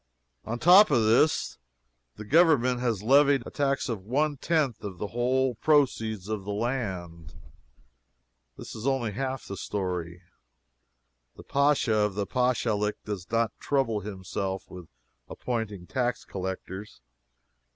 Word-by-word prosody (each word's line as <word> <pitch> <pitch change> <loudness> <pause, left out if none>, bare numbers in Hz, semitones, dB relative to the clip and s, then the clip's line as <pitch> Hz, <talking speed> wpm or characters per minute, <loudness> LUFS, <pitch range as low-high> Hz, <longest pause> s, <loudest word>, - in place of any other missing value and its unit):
On 115 - -3
top 180 - +7
of 120 -7 +3
this 120 +8 +2 0.6
the 105 - -9
Government 135 -4 +4
has 115 -5 -1
levied 140 +1 +4
a - - -8
tax 140 -1 0
of 110 -6 -4
one 145 +7 0
tenth 145 -4 0
of 95 -3 -6
the 105 +2 -4
whole 130 +2 +1
proceeds 115 -8 +1
of 105 -2 -3
the 100 - -8
land. 95 - -4 1.2
This - - -9
is 110 +4 -5
only 130 -5 0
half 130 +4 -4
the 100 - -6
story. 90 -3 -4 1.1
The - - -12
Pacha 140 -4 +2
of 105 -2 +1
a 100 - 0
Pachalic 115 -4 0
does 100 -4 -5
not 115 -1 +1
trouble 130 -7 0
himself 95 -1 -4
with 90 -3 -10 0.4
appointing 110 -7 -4
tax 125 +2 -2
collectors. 95 0 -6
115 Hz, 130 wpm, -27 LUFS, 100-130 Hz, 1.2 s, top